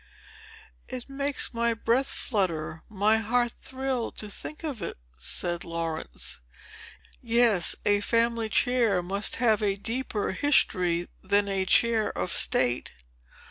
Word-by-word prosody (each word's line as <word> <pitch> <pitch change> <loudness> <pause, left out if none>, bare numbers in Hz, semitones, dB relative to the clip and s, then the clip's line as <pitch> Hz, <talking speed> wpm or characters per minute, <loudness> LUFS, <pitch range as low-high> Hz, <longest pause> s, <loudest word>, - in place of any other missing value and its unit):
"It 255 -2 -6
makes 280 0 -1
my 235 0 +1
breath 235 +4 +1
flutter,—my 195 - 0
heart 240 +2 +1
thrill,—to 260 -5 -3
think 305 +10 -7
of 280 -9 -4
it," - - -4 0.2
said 175 - -2
Laurence. 165 - -4 0.8
"Yes; 230 -6 +3
a 205 0 +3
family 230 0 +1
chair 230 -6 +2
must 200 +3 -1
have 225 -3 +2
a 200 -2 +1
deeper 225 0 -2
history 180 -9 +2
than 200 +1 +2
a 195 -1 0
Chair 225 0 +3
of 180 - -1
State." 125 -1 +1
215 Hz, 115 wpm, -27 LUFS, 190-240 Hz, 0.8 s, Yes